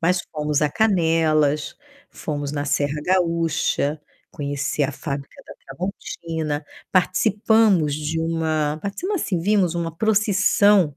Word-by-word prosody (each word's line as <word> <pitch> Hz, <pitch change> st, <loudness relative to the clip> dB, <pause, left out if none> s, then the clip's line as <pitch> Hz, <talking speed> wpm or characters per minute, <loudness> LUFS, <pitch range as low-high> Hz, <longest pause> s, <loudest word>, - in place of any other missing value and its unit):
Mas 180 Hz, +2 st, +2 dB
fomos 150 Hz, -1 st, 0 dB
a 150 Hz, -, +3 dB
Canelas, 160 Hz, -7 st, +2 dB, 0.3 s
fomos 145 Hz, -2 st, -4 dB
na 145 Hz, -1 st, -2 dB
Serra 145 Hz, +1 st, 0 dB
Gaúcha, 165 Hz, -4 st, +1 dB, 0.3 s
conheci 140 Hz, 0 st, -2 dB
a 140 Hz, -, +1 dB
fábrica 140 Hz, 0 st, -6 dB
da -, -, -10 dB
Tramontina, 160 Hz, -5 st, -4 dB, 0.3 s
participamos 195 Hz, -3 st, +3 dB
de 155 Hz, +2 st, -2 dB
uma 160 Hz, -2 st, -1 dB
participamos, 355 Hz, -, -2 dB
assim, 180 Hz, -4 st, -1 dB
vimos 185 Hz, -2 st, +2 dB
uma 165 Hz, -1 st, -3 dB
procissão 205 Hz, -5 st, +3 dB
165 Hz, 115 wpm, -22 LUFS, 150-190 Hz, 0.3 s, a